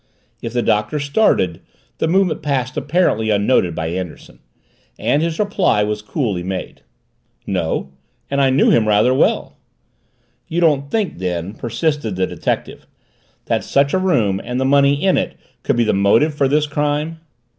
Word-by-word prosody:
If 115 - -5
the 120 -1 0
Doctor 105 +8 0
started, 140 - +1 0.4
the - - +1
movement 180 -2 +1
passed 130 -4 -2
apparently 145 -9 +1
unnoted 100 -4 +2
by 80 0 -3
Anderson. 90 -1 -7 0.6
And 145 - +1
his 165 -1 -1
reply 200 - +1
was 105 0 -2
coolly 105 - -2
made. 95 0 -5 0.6
"No 70 - -2 0.4
and 140 +2 0
I 135 - +4
knew 135 +2 +4
him 110 -2 +3
rather 105 +4 +4
well." 130 - +1 0.9
"You 170 - -2
don't 145 -5 +2
think 210 - -2
then," 90 +1 -3
persisted 120 - -2
the 95 0 +1
detective, - - -4 0.6
"that - - 0
such 140 0 +1
a 190 - +3
room 115 - +1
and 125 +1 -3
the 130 - 0
money 140 +1 +3
in 190 -1 +3
it - - -4 0.3
could - - 0
be 120 - +2
the 110 - +1
motive 100 +10 +3
for 145 -2 +1
this 150 +2 +2
crime?" 150 +2 -2
130 Hz, 160 wpm, -19 LUFS, 105-150 Hz, 0.9 s, I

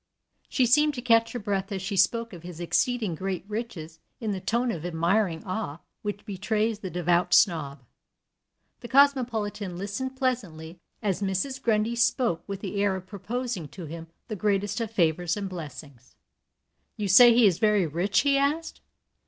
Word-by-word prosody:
She 255 - +2
seemed 295 +5 +4
to 245 - -4
catch 230 -2 +3
her - - -2
breath 200 -2 -2
as 195 - -2
she 195 +2 -4
spoke 230 +5 +2
of 175 - -9
his 175 -1 -9
exceeding 220 +3 0
great 185 +2 -4
riches 190 -8 -6 0.2
in 220 -3 -2
the 195 - -3
tone 235 +4 0
of 165 -6 -5
admiring 170 +1 0
awe 185 -6 -4 0.2
which 205 -1 -5
betrays 215 +2 -1
the 190 - -5
devout 175 0 +2
snob. 150 -8 +2 1.0
The - - -8
cosmopolitan 235 -8 +2
listened 205 +8 -4
pleasantly 185 - -3 0.2
as 195 -2 -1
Mrs. 200 +8 -2
Grundy 225 -1 +1
spoke 235 -7 +1
with 200 -1 -5
the 200 0 -3
air 200 -2 +2
of 185 -1 -7
proposing 210 - -4
to 175 +4 -9
him 165 +2 -8 0.2
the 215 - -4
greatest 205 +2 0
of 225 - -2
favors 175 -3 +1
and 200 -1 -3
blessings. 145 -7 -10 0.8
"You 210 - -2
say 235 +6 +8
he 240 -1 +6
is 185 -5 +3
very 210 -4 +3
rich?" 175 +7 +1
he 280 -1 +3
asked. 300 +4 -1
200 Hz, 170 wpm, -26 LUFS, 175-230 Hz, 1.0 s, say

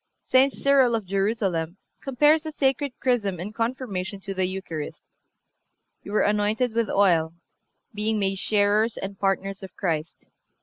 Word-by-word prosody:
(360) 265 +1 +3
St. - - -13
Cyril 270 -4 +4
of 220 -3 -3
Jerusalem 195 -3 -1 0.2
compares 295 +4 +3
the 315 0 -6
sacred 275 -1 0
Chrism 210 -8 0
in 200 +5 -6
Confirmation 225 -5 -3
to 195 0 -5
the 190 -1 0
Eucharist: 180 -5 -6 1.0
"You - - -9
were 215 - +3
anointed 210 +3 +1
with 230 -2 0
oil, 170 -5 +2 0.6
being 215 +1 -1
made 195 -1 0
sharers 210 +2 +2
and 195 0 -6
partners 195 0 -1
of 190 - -10
Christ. 160 -3 -3
205 Hz, 145 wpm, -25 LUFS, 190-240 Hz, 1.0 s, Cyril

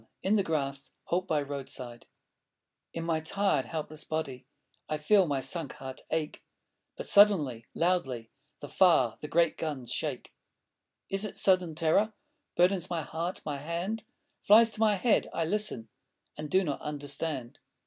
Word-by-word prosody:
IN 200 +3 +3
THE 205 - +4
GRASS: 140 -5 -2
HALT 180 +2 -1
BY 150 -2 +1
ROADSIDE 130 -4 -7 0.8
In 165 - -4
my 165 -1 0
tired, 180 -3 0
helpless 155 -1 -5
body 135 -5 -4 0.4
I 155 - 0
feel 185 +5 +4
my 140 -2 0
sunk 160 -1 -3
heart 130 -1 -8
ache; 155 -1 -2 0.5
But - - -5
suddenly, 150 - +4
loudly 135 -10 0 0.3
The - - -6
far, 165 - +3
the 150 - -6
great 170 +1 +2
guns 145 -7 -3
shake. - - -4 0.8
Is 195 +1 +1
it 210 - -5
sudden 185 -4 +3
terror 170 +7 +2 0.4
Burdens 180 0 +3
my 170 -3 -2
heart? 165 +4 -4
My 145 -2 -2
hand 175 +9 -3 0.4
Flies 225 +2 +6
to - - -6
my 215 -2 +4
head. 220 +4 +2
I 165 - 0
listen.... 205 - -1 0.5
And 150 0 -6
do 190 +5 +3
not 145 -5 -3
understand. 145 -3 -4
160 Hz, 150 wpm, -30 LUFS, 140-185 Hz, 0.8 s, Flies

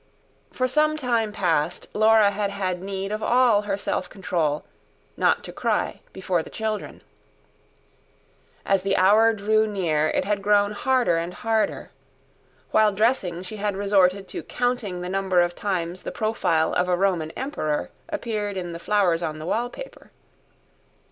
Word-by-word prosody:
For 255 - 0
some 305 +3 +2
time 235 -6 0
past 175 -7 -1
Laura 215 -1 +5
had 205 0 -1
had 185 -3 -3
need 195 +1 -4
of 215 +1 -3
all 240 -3 +4
her 200 -1 -2
self 205 - -3
control, 165 -6 -2 0.5
not - - +2
to - - -8
cry - - -1
before 185 -2 -1
the - - -10
children. 220 -1 -4 1.6
As 195 -1 +2
the 195 0 0
hour 215 +4 +5
drew 215 +1 +1
near 165 -7 0
it - - 0
had 205 0 0
grown 205 0 +3
harder 245 -4 +1
and 170 +2 -4
harder; 225 +2 -1 0.8
while 215 -1 +4
dressing, 195 -5 0
she 215 +4 -7
had 205 -1 -2
resorted 195 -1 +2
to - - -5
counting 245 -7 -2
the 180 - -4
number 190 -1 +1
of 175 0 +2
times 180 -3 -3
the - - -5
profile 170 -8 0
of 180 0 +1
a 180 - +2
Roman 180 -5 +1
emperor 200 - -2 0.2
appeared 215 -9 -3
in 175 -2 -4
the 170 - -7
flowers 180 -3 +1
on 155 -2 -3
the 155 - -7
wallpaper. 245 - -4
200 Hz, 155 wpm, -24 LUFS, 180-220 Hz, 1.6 s, Laura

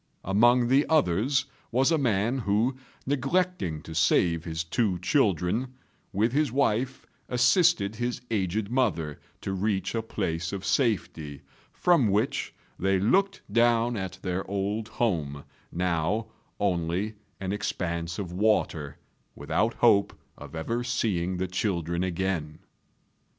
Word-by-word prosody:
Among 120 +5 +4
the 135 +4 +3
others 135 - +2 0.3
was 130 +6 +3
a 165 - +4
man 120 0 +1
who, 110 +4 +1 0.3
neglecting 145 - 0
to 80 - -8
save 85 0 +2
his 80 0 -3
two 95 +2 0
children, 100 - +1 0.4
with 110 +3 +1
his 145 -3 +2
wife 130 -1 0 0.2
assisted 125 - +3
his 120 +1 -2
aged 100 +1 -1
mother 85 - 0 0.2
to 95 - -3
reach 95 -1 -1
a 115 - 0
place 85 -7 -3
of 100 -1 -4
safety, 80 - -1 0.3
from 170 -10 +3
which 105 +6 0 0.3
they 95 0 +2
looked 195 - +2
down 120 0 +3
at 95 -3 -4
their 90 +1 -1
old 100 +2 -2
home, 75 -14 -1 0.3
now 90 +5 0 0.3
only 90 +2 0 0.3
an 95 -1 -3
expanse 85 -4 -3
of 95 -4 -4
water, 90 -7 0 0.4
without 115 +2 0
hope 100 -4 +3 0.2
of - - -11
ever 115 +10 -2
seeing 95 -7 -1
the 95 - -1
children 85 -2 -1
again. 90 -4 -2
100 Hz, 125 wpm, -27 LUFS, 90-120 Hz, 0.4 s, Among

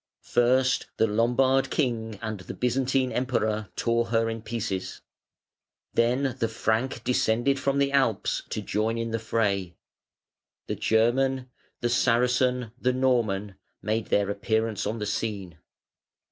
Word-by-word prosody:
First 130 +2 +2
the - - +4
Lombard 125 +5 +2
King 115 -6 -1
and 110 -2 -3
the 95 - -8
Byzantine 130 +1 +1
Emperor 110 -4 -1
tore 115 0 +1
her 115 0 +1
in 115 0 -5
pieces. 105 -4 -4 0.9
Then 125 +3 +1
the 115 - +1
Frank 115 +2 -1
descended 125 +2 +1
from 140 +1 0
the 140 0 +2
Alps 130 -7 +1
to - - -3
join 110 +2 -1
in 115 0 -3
the 115 - -1
fray. 100 -5 -1 0.9
The - - -3
German, 125 +3 +1 0.3
the 120 - +1
Saracen, 125 0 +2
the 125 0 +1
Norman 110 -7 0 0.3
made 110 +1 -1
their 100 0 +1
appearance 110 +1 -1
on 110 +2 -2
the 105 - -3
scene. 100 -7 -3
115 Hz, 130 wpm, -26 LUFS, 110-125 Hz, 0.9 s, the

